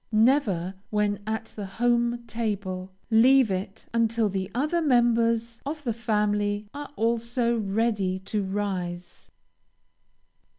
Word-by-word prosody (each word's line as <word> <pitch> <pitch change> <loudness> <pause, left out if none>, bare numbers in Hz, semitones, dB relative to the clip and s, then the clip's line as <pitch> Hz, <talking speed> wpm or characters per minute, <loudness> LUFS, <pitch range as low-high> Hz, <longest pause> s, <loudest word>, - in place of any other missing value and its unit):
Never, 215 -6 +2 0.2
when 210 -1 0
at 220 +1 -2
the 205 -2 -5
home 240 0 +2
table, 200 -5 -3 0.2
leave 245 +1 +6
it 190 +2 -4
until 230 -1 +2
the 190 0 -3
other 305 +7 +1
members 230 -4 +2
of 300 +1 -5
the 235 -4 -1
family 210 -2 0
are 290 0 -6
also 235 +1 +1
ready 205 -2 0
to 195 +2 -3
rise. 185 -3 -4
220 Hz, 115 wpm, -26 LUFS, 200-235 Hz, 0.2 s, leave